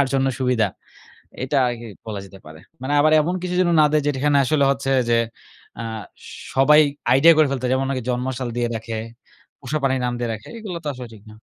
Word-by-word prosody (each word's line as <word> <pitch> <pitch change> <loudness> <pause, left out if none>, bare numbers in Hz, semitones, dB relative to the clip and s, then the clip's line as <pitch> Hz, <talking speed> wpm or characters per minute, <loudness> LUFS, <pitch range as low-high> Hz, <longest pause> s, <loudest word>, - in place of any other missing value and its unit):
তার 140 - +3
জন্য 135 0 +2
সুবিধা। 125 -5 +2 0.8
এটা 140 +2 0
আগেই 115 -2 -7
বলা 105 -3 -5
যেতে 95 0 -14
পারে। 80 0 -12 0.2
মানে 140 +3 -2
আবার 155 +1 +4
এমন 175 +4 -1
কিছু 180 0 -3
যেন 180 -1 +3
না - - +6
দেয় 155 - +3
যেটা 145 -2 0
এখানে 145 -1 +3
আসলে 150 +1 +2
হচ্ছে 135 0 -2 0.2
যে 115 - +4 0.6
আ - - -3 0.7
সবাই 150 +3 +6 0.3
আইডিয়া 160 +6 +7
করে 155 -2 +5
ফেলতে 135 -2 -3
পারে। 125 - 0
যেমন 135 +1 0
অনেকে 130 -3 -2
জন্মসাল 125 0 -2
দিয়ে 120 -1 +1
রাখে, 115 0 -5 0.6
পোষা 140 +3 -3
প্রাণীর 130 -1 +1
নাম 125 - -1
দিয়ে 120 -1 -2
রাখে। 110 0 -9
এগুলা 190 -6 -6
তো - - -5
আসলে 125 -1 -8
ঠিক 105 -2 -15
না। 105 - -13
130 Hz, 215 wpm, -21 LUFS, 120-145 Hz, 0.8 s, আইডিয়া